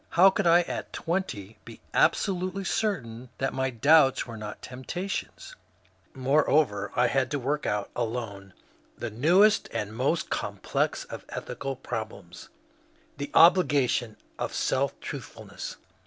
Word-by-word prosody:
How 190 Hz, +3 st, +6 dB
could 200 Hz, -2 st, 0 dB
I 170 Hz, +1 st, +7 dB
at -, -, -5 dB
twenty 130 Hz, -, -3 dB
be -, -, -12 dB
absolutely 185 Hz, 0 st, +1 dB
certain 130 Hz, -, -2 dB
that 135 Hz, 0 st, -1 dB
my 130 Hz, 0 st, 0 dB
doubts 135 Hz, +3 st, +4 dB
were 115 Hz, -, -8 dB
not 105 Hz, -1 st, -8 dB
temp 125 Hz, +1 st, -9 dB
tations? 195 Hz, -, -4 dB, 0.6 s
Moreover, 130 Hz, -6 st, +2 dB
I 125 Hz, -, +4 dB
had 130 Hz, +1 st, +1 dB
to 145 Hz, -, -1 dB
work 145 Hz, +3 st, -2 dB
out 105 Hz, 0 st, -2 dB
alone 110 Hz, -5 st, -4 dB, 0.4 s
the 120 Hz, -, -4 dB
newest 180 Hz, -, +4 dB
and 105 Hz, +1 st, -4 dB
most 140 Hz, +7 st, 0 dB
complex -, -, -1 dB
of -, -, -9 dB
ethical 135 Hz, -1 st, -5 dB
problems, 110 Hz, -7 st, -7 dB, 0.3 s
— -, -, -35 dB
the 140 Hz, -, -4 dB
obligation 140 Hz, -, +4 dB, 0.2 s
of -, -, -3 dB
self -, -, 0 dB
truthful -, -, -8 dB
ness. -, -, -7 dB
135 Hz, 140 wpm, -27 LUFS, 115-170 Hz, 0.6 s, I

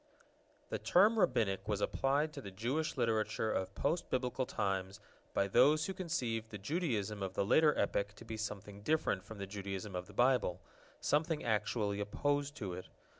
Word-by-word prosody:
The -, -, -2 dB
term 215 Hz, +5 st, +5 dB
Rabbinic 110 Hz, -, +2 dB
was 105 Hz, -2 st, 0 dB
applied 145 Hz, +7 st, +1 dB
to 140 Hz, -, -6 dB
the 100 Hz, -, -7 dB
Jewish 125 Hz, +12 st, -2 dB
Literature 110 Hz, -2 st, +1 dB
of 95 Hz, +1 st, -2 dB
post 170 Hz, -, 0 dB
Biblical 125 Hz, 0 st, -1 dB
times 95 Hz, -1 st, -2 dB, 0.4 s
by 100 Hz, -, +3 dB
those 150 Hz, +10 st, +5 dB
who 190 Hz, -, -3 dB
conceived 125 Hz, -12 st, -2 dB
the 105 Hz, -, -6 dB
Judaism 105 Hz, -, -1 dB
of 95 Hz, -1 st, -3 dB
the 100 Hz, -, +1 dB
later 150 Hz, +8 st, +5 dB
epoch 100 Hz, 0 st, 0 dB
to 115 Hz, -, -12 dB
be 115 Hz, -1 st, -5 dB
something 105 Hz, -2 st, -5 dB
different 130 Hz, -7 st, +1 dB
from 110 Hz, -, -10 dB
the 100 Hz, -, -4 dB
Judaism 100 Hz, 0 st, -5 dB
of 90 Hz, 0 st, -4 dB
the -, -, -13 dB
Bible, 120 Hz, -8 st, +3 dB, 0.4 s
something 155 Hz, +1 st, +1 dB
actually 105 Hz, -2 st, 0 dB
opposed 145 Hz, +7 st, 0 dB
to 100 Hz, -9 st, -4 dB
it. 90 Hz, +1 st, -7 dB
110 Hz, 175 wpm, -35 LUFS, 100-145 Hz, 0.4 s, term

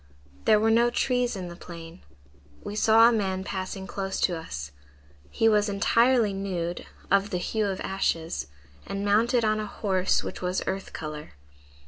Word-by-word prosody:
"There 215 Hz, -, +5 dB
were 220 Hz, +1 st, +3 dB
no 235 Hz, +1 st, +4 dB
trees 245 Hz, -1 st, 0 dB
in 185 Hz, -2 st, -5 dB
the 170 Hz, -, -8 dB
plain. 170 Hz, 0 st, -10 dB, 0.6 s
We 205 Hz, -, -5 dB
saw 225 Hz, +1 st, +6 dB
a -, -, +5 dB
man 190 Hz, -4 st, -1 dB
passing 190 Hz, 0 st, -5 dB
close 195 Hz, 0 st, -4 dB
to 180 Hz, -, +2 dB
us. 75 Hz, -, -6 dB, 0.6 s
He 225 Hz, -, +2 dB
was 210 Hz, -1 st, +3 dB
entirely 230 Hz, +2 st, +3 dB
nude, 180 Hz, -3 st, -3 dB, 0.2 s
of 200 Hz, +1 st, +3 dB
the 180 Hz, -, -1 dB
hue 215 Hz, +4 st, -1 dB
of 190 Hz, -1 st, -3 dB
ashes, 165 Hz, -, -1 dB, 0.4 s
and 195 Hz, +1 st, -3 dB
mounted 230 Hz, +3 st, +3 dB
on 215 Hz, 0 st, +2 dB
a 215 Hz, -, -3 dB
horse 190 Hz, -4 st, 0 dB
which -, -, -6 dB
was 180 Hz, +1 st, -1 dB
earth 190 Hz, 0 st, -3 dB
color. 155 Hz, -1 st, -7 dB
195 Hz, 165 wpm, -26 LUFS, 180-220 Hz, 0.6 s, saw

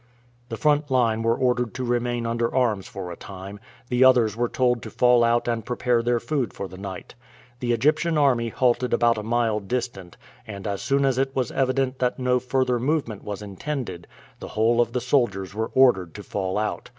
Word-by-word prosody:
The 115 Hz, -, -4 dB
front 150 Hz, +1 st, +2 dB
line 115 Hz, -4 st, +2 dB
were 115 Hz, +1 st, +2 dB
ordered 125 Hz, -2 st, 0 dB
to 130 Hz, -, -3 dB
remain 120 Hz, -1 st, -1 dB
under 115 Hz, 0 st, -1 dB
arms 115 Hz, -7 st, +1 dB
for 90 Hz, -2 st, -7 dB
a -, -, -6 dB
time; 100 Hz, +2 st, -9 dB, 0.3 s
the 125 Hz, +1 st, +3 dB
others 120 Hz, -5 st, +5 dB
were 120 Hz, +1 st, 0 dB
told 125 Hz, -2 st, +1 dB
to -, -, -7 dB
fall 125 Hz, -1 st, +4 dB
out 120 Hz, +1 st, +2 dB
and 115 Hz, -2 st, -1 dB
prepare 125 Hz, 0 st, 0 dB
their 120 Hz, 0 st, +1 dB
food 125 Hz, -3 st, -2 dB
for 100 Hz, -, -5 dB
the 95 Hz, -, -12 dB
night. 95 Hz, -2 st, -8 dB, 0.5 s
The 120 Hz, -2 st, -1 dB
Egyptian 155 Hz, +7 st, +2 dB
army 125 Hz, -5 st, +2 dB
halted 125 Hz, +1 st, +1 dB
about 115 Hz, -2 st, +2 dB
a -, -, -3 dB
mile 115 Hz, -1 st, 0 dB
distant, 100 Hz, -4 st, -5 dB, 0.3 s
and 100 Hz, -1 st, -8 dB
as 100 Hz, -2 st, -3 dB
soon 140 Hz, 0 st, +1 dB
as 130 Hz, -1 st, +1 dB
it 135 Hz, 0 st, -1 dB
was 125 Hz, -3 st, -1 dB
evident 130 Hz, 0 st, 0 dB
that 125 Hz, -1 st, 0 dB
no 125 Hz, -1 st, +1 dB
further 125 Hz, 0 st, 0 dB
movement 130 Hz, -5 st, -1 dB
was 105 Hz, 0 st, -6 dB
intended, 100 Hz, -, -5 dB, 0.3 s
the -, -, -7 dB
whole 115 Hz, +2 st, +3 dB
of 120 Hz, -1 st, -1 dB
the 125 Hz, -, -1 dB
soldiers 95 Hz, -10 st, 0 dB
were 110 Hz, +1 st, -2 dB
ordered 120 Hz, -10 st, +4 dB
to 105 Hz, -, -8 dB
fall 95 Hz, -1 st, -3 dB
out. 105 Hz, 0 st, -3 dB
120 Hz, 200 wpm, -24 LUFS, 105-130 Hz, 0.5 s, others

